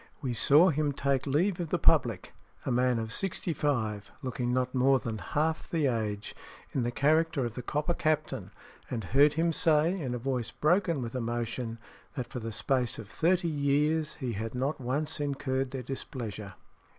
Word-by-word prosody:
We 130 -3 -2
saw 150 +9 +6
him 150 -1 0
take 140 0 0
leave 170 +7 +1
of 175 - -2
the - - +1
public, - - +2 0.3
a - - 0
man 125 0 +2
of 110 -1 -3
sixty 185 -3 -1
five, 110 -9 -1
looking 125 -1 -2
not 125 0 0
more 135 +1 +4
than 115 -4 -4
half 155 +5 -1
the 160 -3 +1
age, 110 -5 -2 0.4
in 135 - +1
the 120 - 0
character 155 +2 +2
of 120 - -4
the 125 - -5
Copper 150 +7 -1
Captain; 155 - -1 0.4
and 115 -3 -3
heard 140 - +4
him 165 +1 +1
say, 160 +2 +3
in 140 -10 -3
a - - -1
voice 125 -2 -2
broken 165 - +1
with 115 - -5
emotion, 120 -1 -3 0.4
that 125 -4 -2
for 125 - -6
the 115 0 -5
space 125 +1 0
of 110 -3 -9
thirty 175 +6 +2
years 150 +1 +1
he 130 -5 -3
had 110 +3 -4
not 135 +3 -1
once 150 +6 -1
incurred 135 -2 -1
their 130 -1 -5
displeasure." 110 - -6
135 Hz, 180 wpm, -30 LUFS, 120-155 Hz, 0.4 s, saw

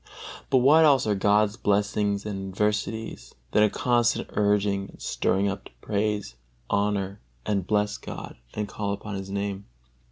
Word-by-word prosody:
But 130 - +4
what 145 +6 +6
else 140 -4 +5
are 105 - +2
God's 105 +2 +2
blessings 105 -1 +1
and 95 -2 -4
adversities 105 - -2 0.2
than - - +4
a 105 - +5
constant 120 0 +1
urging 100 -1 +1
and - - -15
stirring 100 +1 0
up 100 0 -4
to - - -12
praise, 105 - -1 0.4
honor, 100 -1 0 0.2
and 100 -3 -1
bless 105 0 +1
God, - - -8 0.2
and 105 -1 -2
to - - -14
call 100 -1 -2
upon 105 +1 -6
His 95 0 -5
Name? 100 0 -3
105 Hz, 160 wpm, -26 LUFS, 100-105 Hz, 0.4 s, what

